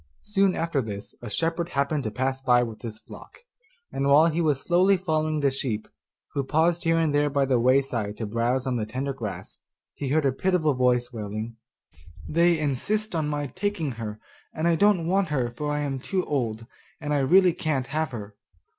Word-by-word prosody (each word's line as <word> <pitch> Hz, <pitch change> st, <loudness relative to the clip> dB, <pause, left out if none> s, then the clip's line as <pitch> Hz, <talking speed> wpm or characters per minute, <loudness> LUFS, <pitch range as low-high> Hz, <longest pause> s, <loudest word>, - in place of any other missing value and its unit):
Soon 195 Hz, -2 st, +2 dB
after 165 Hz, -4 st, 0 dB
this 105 Hz, -3 st, -7 dB
a 120 Hz, -, -6 dB
shepherd 165 Hz, -, -1 dB
happened 140 Hz, -1 st, 0 dB
to -, -, 0 dB
pass 130 Hz, +4 st, -2 dB
by 125 Hz, -2 st, +4 dB
with 110 Hz, -3 st, -7 dB
his 110 Hz, -2 st, -6 dB
flock, 475 Hz, -, -14 dB, 0.5 s
and 140 Hz, -, -1 dB
while 145 Hz, +3 st, +6 dB
he 165 Hz, 0 st, +1 dB
was 150 Hz, -4 st, +2 dB
slowly 185 Hz, +5 st, +3 dB
following 155 Hz, -3 st, -1 dB
the 140 Hz, -1 st, +3 dB
sheep, 120 Hz, -5 st, -3 dB, 0.5 s
who 140 Hz, -, 0 dB
paused 165 Hz, +5 st, +1 dB
here 165 Hz, 0 st, +3 dB
and 160 Hz, -3 st, +1 dB
there 145 Hz, 0 st, +3 dB
by 140 Hz, -1 st, +1 dB
the 130 Hz, -2 st, +2 dB
wayside 125 Hz, -4 st, +1 dB
to 115 Hz, -, -3 dB
browse 120 Hz, +4 st, 0 dB
on 130 Hz, -2 st, 0 dB
the 110 Hz, -2 st, -2 dB
tender 130 Hz, +5 st, -3 dB
grass, 110 Hz, -7 st, -7 dB, 0.3 s
he 140 Hz, -, -5 dB
heard 150 Hz, +1 st, +2 dB
a 135 Hz, -, +4 dB
pitiful 160 Hz, 0 st, +1 dB
voice 125 Hz, -1 st, +1 dB
wailing, 110 Hz, +1 st, -5 dB, 0.7 s
'They 170 Hz, +1 st, +3 dB
insist 190 Hz, -, -1 dB
on 160 Hz, -3 st, 0 dB
my 145 Hz, -1 st, -2 dB
taking 185 Hz, -1 st, -2 dB
her, 110 Hz, -2 st, -6 dB, 0.4 s
and 160 Hz, +2 st, 0 dB
I 170 Hz, -, +4 dB
don't 195 Hz, -1 st, +3 dB
want 190 Hz, +2 st, +2 dB
her, 130 Hz, -6 st, -1 dB
for 150 Hz, +5 st, -3 dB
I 150 Hz, 0 st, -1 dB
am 135 Hz, -2 st, -2 dB
too 185 Hz, +7 st, -2 dB
old, 115 Hz, -6 st, -2 dB, 0.3 s
and 150 Hz, -2 st, -2 dB
I 145 Hz, -, +2 dB
really 180 Hz, +6 st, +5 dB
can't 155 Hz, -6 st, -1 dB
have 155 Hz, +1 st, -1 dB
her. 105 Hz, -4 st, -8 dB
140 Hz, 200 wpm, -26 LUFS, 125-165 Hz, 0.7 s, while